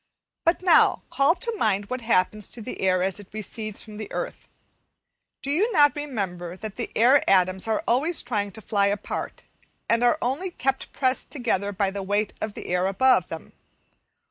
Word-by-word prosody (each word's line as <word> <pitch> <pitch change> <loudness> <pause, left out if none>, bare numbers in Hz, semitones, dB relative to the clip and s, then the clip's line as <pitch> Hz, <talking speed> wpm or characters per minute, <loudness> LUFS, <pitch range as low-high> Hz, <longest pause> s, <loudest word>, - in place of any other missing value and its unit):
But 335 +2 +2
now, 350 -3 +5
call 280 +5 +4
to 465 +1 -3
mind 205 - 0
what 255 0 -2
happens 215 -2 +1
to 235 - -9
the 250 - -6
air 185 -1 +2
as 190 +2 -1
it 205 - -12
recedes 215 0 -4
from 215 -2 -11
the 215 - -7
earth. - - -5 1.0
Do 275 - -1
you 400 +11 +2
not 290 -5 +5
remember 190 - -4
that 215 0 -7
the - - -4
air 255 +5 +5
atoms 185 +1 +3
are 220 -1 0
always 310 +8 +2
trying 210 -4 -2
to 220 - -10
fly 200 -1 +1
apart, 200 0 -4 0.4
and 230 +1 +2
are 245 +5 +4
only 280 +10 -1
kept 270 -5 -2
pressed 260 -1 0
together 225 -7 -1
by 195 0 0
the 200 0 -4
weight 205 +2 -1
of 215 -1 -3
air 180 +1 -1
above 195 -1 +3
them? 165 - -8
215 Hz, 180 wpm, -25 LUFS, 195-265 Hz, 1.0 s, now